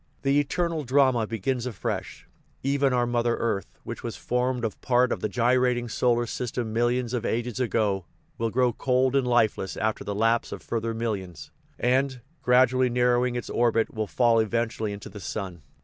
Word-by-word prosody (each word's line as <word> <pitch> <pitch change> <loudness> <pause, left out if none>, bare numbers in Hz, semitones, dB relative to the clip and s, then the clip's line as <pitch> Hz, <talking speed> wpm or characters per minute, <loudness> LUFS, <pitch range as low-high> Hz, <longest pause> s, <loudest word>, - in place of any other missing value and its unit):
The 140 +1 +3
eternal 165 +2 -1
drama 130 -3 +3
begins 120 +3 -2
afresh. 115 -6 -4 0.4
Even 140 0 +2
our 125 -1 +2
mother 120 0 +1
earth, 110 -4 -2
which - - -6
was - - -5
formed 125 0 -1
of 110 - -5
part 125 0 +3
of - - -1
the 110 - -2
gyrating 125 +2 +2
solar 120 +1 +1
system 120 -1 -3
millions 120 +1 +1
of 120 -2 -1
ages 120 +1 -2
ago, 105 -6 0 0.3
will 115 0 0
grow 125 +1 +2
cold 130 +1 +1
and 135 -2 +2
lifeless 110 -5 +1
after 110 0 -1
the 100 - -4
lapse 115 +2 +1
of - - -7
further 115 0 -2
millions, 100 -7 -4 0.3
and, 130 +1 +1 0.2
gradually 130 0 +4
narrow 125 0 +3
ing 125 -1 -1
its 120 - -4
orbit, 115 -1 +1
will 110 -1 -2
fall 115 +1 +3
eventually 110 -1 -1
into 100 0 -7
the 105 +1 -9
sun. 95 -3 -5
120 Hz, 175 wpm, -26 LUFS, 110-125 Hz, 0.4 s, gradually